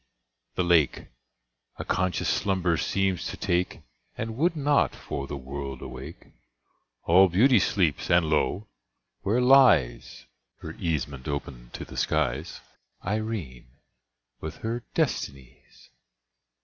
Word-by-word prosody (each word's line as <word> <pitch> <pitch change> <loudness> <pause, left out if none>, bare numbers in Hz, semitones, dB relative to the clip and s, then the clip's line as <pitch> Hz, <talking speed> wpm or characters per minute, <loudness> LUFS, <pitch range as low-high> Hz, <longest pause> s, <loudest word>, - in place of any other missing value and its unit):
the 90 - +1
lake 85 -5 +2 0.7
A - - -5
conscious 90 -1 0
slumber 95 -3 +1
seems 95 +2 0
to - - -6
take, 90 +1 -1 0.4
And 115 0 -4
would 165 +6 +1
not, 145 -1 +2
for 70 0 -5
the 70 - -5
world, 70 0 -6
awake. 65 +5 -9 0.8
All 95 +3 +6
Beauty 115 +7 +5
sleeps!—and 85 -2 +2
lo! 90 +6 0 0.5
where 110 +5 +1
lies 95 - +4 0.4
(Her - - -7
casement 75 -5 -3
open 70 -4 -5
to - - -6
the - - -11
skies) - - -1 0.4
Irene, 90 - -4 0.6
with 80 - -6
her 115 +2 -2
Destinies! 65 -2 -4
85 Hz, 110 wpm, -26 LUFS, 70-105 Hz, 0.8 s, All